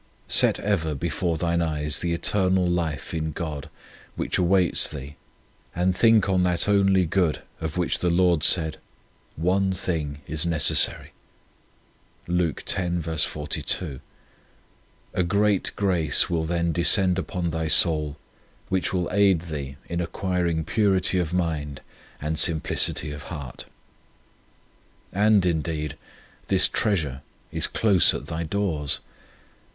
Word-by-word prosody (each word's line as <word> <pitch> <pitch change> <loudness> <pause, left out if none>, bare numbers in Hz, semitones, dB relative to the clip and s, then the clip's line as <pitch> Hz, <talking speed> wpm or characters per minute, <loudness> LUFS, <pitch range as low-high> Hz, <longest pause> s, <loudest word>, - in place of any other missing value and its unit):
Set - - +4
ever 80 -7 -1
before 85 +4 -2
thine 85 +1 0
eyes 75 -3 -2
the 85 - -2
eternal 95 +1 +1
life 85 -3 -2
in 80 -1 -2
God, 75 -1 -6 0.5
which - - -2
awaits 90 0 +2
thee, 70 -1 -9 0.6
and 90 +1 +1
think 110 -1 +4
on 95 -1 +1
that 90 0 +1
only 95 -2 +3
good 85 -1 0 0.2
of 80 +1 -5
which 90 - 0
the 90 - 0
Lord 85 -2 +2
said: 80 -3 +5 0.3
" - - -36 0.2
One 95 0 +1
thing 80 -6 -2
is 80 +2 -1
necessary." 80 -4 +1 1.1
2 85 -3 0 2.6
A 90 - +1
great 100 +2 +1
grace 90 -7 +2
will 80 -2 0
then 85 0 -1
descend 90 +2 +3
upon 90 -2 -3
thy 80 0 -2
soul, 75 -3 +3 0.5
which 95 -1 -1
will 90 -2 -1
aid 95 -3 +3
thee 70 -5 -6
in 85 +1 -3
acquiring 85 -2 -2
purity 95 -1 +1
of 85 -3 -2
mind 80 -6 -2 0.4
and 75 +1 -3
simplicity 80 -2 +2
of 75 0 -7
heart. 70 -6 -8 1.5
And, 105 -1 +3
indeed, 80 -3 -2 0.5
this 95 -1 +5
treasure 80 - -1 0.3
is - - 0
close 100 -6 +3
at - - -6
thy 80 0 -4
doors. 80 -4 -1
85 Hz, 125 wpm, -24 LUFS, 80-95 Hz, 2.6 s, said